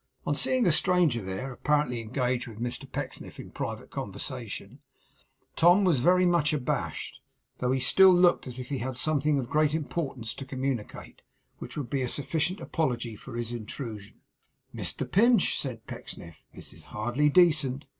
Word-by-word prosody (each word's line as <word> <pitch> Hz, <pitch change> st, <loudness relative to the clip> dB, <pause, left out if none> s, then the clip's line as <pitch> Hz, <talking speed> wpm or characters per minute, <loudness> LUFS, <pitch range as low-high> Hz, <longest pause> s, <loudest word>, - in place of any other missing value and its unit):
On -, -, +1 dB
seeing 255 Hz, -3 st, +2 dB
a 175 Hz, -, +5 dB
stranger 170 Hz, -8 st, +3 dB
there, 95 Hz, +7 st, -4 dB
apparently 145 Hz, -3 st, 0 dB
engaged 125 Hz, +2 st, -1 dB
with 110 Hz, -2 st, -10 dB
Mr 120 Hz, +1 st, -4 dB
Pecksniff -, -, -5 dB
in -, -, -9 dB
private -, -, -5 dB
conversation, -, -, -6 dB, 0.8 s
Tom 175 Hz, +4 st, +6 dB
was 170 Hz, -8 st, +3 dB
very 180 Hz, +7 st, +4 dB
much 170 Hz, -4 st, +3 dB
abashed, 140 Hz, -4 st, -3 dB, 0.4 s
though 125 Hz, 0 st, +1 dB
he 130 Hz, -, +1 dB
still 190 Hz, +9 st, +7 dB
looked 175 Hz, -4 st, +4 dB
as 125 Hz, -1 st, -7 dB
if 125 Hz, -1 st, -7 dB
he 140 Hz, -2 st, -2 dB
had 130 Hz, +1 st, -4 dB
something 150 Hz, 0 st, +1 dB
of 130 Hz, -3 st, -2 dB
great 150 Hz, +2 st, +2 dB
importance 135 Hz, -7 st, -3 dB
to -, -, -7 dB
communicate, 130 Hz, -4 st, -4 dB, 0.4 s
which -, -, -8 dB
would 140 Hz, -5 st, -4 dB
be 140 Hz, -2 st, 0 dB
a 125 Hz, -, 0 dB
sufficient 160 Hz, -, -1 dB
apology 125 Hz, -7 st, -2 dB
for 115 Hz, +3 st, -10 dB
his 120 Hz, 0 st, -3 dB
intrusion. 110 Hz, -2 st, -7 dB, 0.5 s
'Mr -, -, -2 dB
Pinch,' 230 Hz, +1 st, +4 dB
said 120 Hz, -5 st, -5 dB
Pecksniff, 85 Hz, -2 st, -9 dB
'this -, -, -8 dB
is -, -, -10 dB
hardly 120 Hz, +7 st, 0 dB
decent. 155 Hz, -5 st, +3 dB
135 Hz, 165 wpm, -28 LUFS, 120-160 Hz, 0.8 s, still